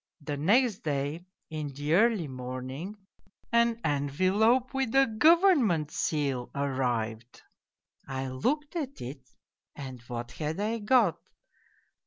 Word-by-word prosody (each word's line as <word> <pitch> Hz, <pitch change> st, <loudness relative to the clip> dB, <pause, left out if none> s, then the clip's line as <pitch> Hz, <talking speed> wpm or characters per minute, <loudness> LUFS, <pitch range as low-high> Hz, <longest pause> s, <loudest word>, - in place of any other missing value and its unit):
The 145 Hz, 0 st, -3 dB
next 210 Hz, -, +3 dB
day, 150 Hz, +4 st, -3 dB, 0.2 s
in 155 Hz, -2 st, -3 dB
the 145 Hz, +3 st, -1 dB
early 210 Hz, -3 st, +3 dB
morning, 130 Hz, +8 st, -6 dB, 0.6 s
an 235 Hz, 0 st, +3 dB
envelope 185 Hz, -, +2 dB
with 270 Hz, -3 st, -1 dB
a 270 Hz, 0 st, +7 dB
government 250 Hz, -, +4 dB
seal 140 Hz, -5 st, -1 dB
arrived. 125 Hz, -4 st, -2 dB, 0.6 s
I 135 Hz, 0 st, -3 dB
looked 285 Hz, -, -1 dB
at 280 Hz, -5 st, -4 dB
it 130 Hz, +1 st, -8 dB, 0.5 s
and 130 Hz, -4 st, -8 dB
what 120 Hz, 0 st, -5 dB
had 155 Hz, +5 st, -4 dB
I 220 Hz, +3 st, -1 dB
got 215 Hz, -4 st, +3 dB
155 Hz, 115 wpm, -29 LUFS, -, 0.6 s, a